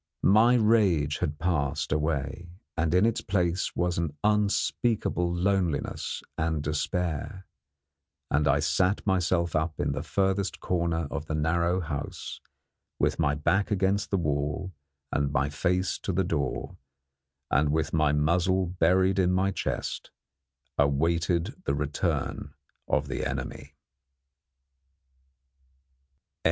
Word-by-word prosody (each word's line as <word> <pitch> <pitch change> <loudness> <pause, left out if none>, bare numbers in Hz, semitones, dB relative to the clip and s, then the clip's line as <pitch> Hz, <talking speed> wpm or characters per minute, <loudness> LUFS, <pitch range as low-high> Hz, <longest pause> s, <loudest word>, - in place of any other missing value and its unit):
My 115 +4 +6
rage 100 -11 +3
had 75 - -2
passed 75 -3 -1
away, 75 +2 -1 0.3
and 80 -1 0
in 90 +4 +5
its 115 -1 +1
place 90 -2 0
was 90 -1 0
an 75 -3 -3
unspeakable 105 -2 +1
loneliness 90 -4 -1 0.2
and 80 -2 0
despair; 80 +4 -2 0.9
and 75 +1 +2
I - - +3
sat 95 +2 +1
myself 90 -3 +1
up 80 0 -1
in - - 0
the 70 +1 -3
furthest 95 +3 0
corner 85 -3 -1
of 80 0 -4
the 80 - -2
narrow 85 +4 +1
house, 75 -4 -5 0.6
with - - 0
my 75 -3 +2
back 95 +8 +1
against 100 0 +1
the 100 - +1
wall 75 +3 -2 0.4
and 70 0 0
my 70 0 0
face 90 +5 0
to - - -3
the 95 +1 +1
door, 75 -7 -2 0.7
and, 75 +1 +3
with 80 0 0
my 75 -2 +3
muzzle 85 +5 +2
buried 90 +2 +2
in 90 -1 +3
my 95 +1 +2
chest, - - -3 0.7
awaited 80 +4 +1
the 70 - +1
return 75 0 -2 0.3
of 75 -1 +1
the 65 - -3
enemy. - - -5
85 Hz, 120 wpm, -27 LUFS, 75-95 Hz, 0.9 s, My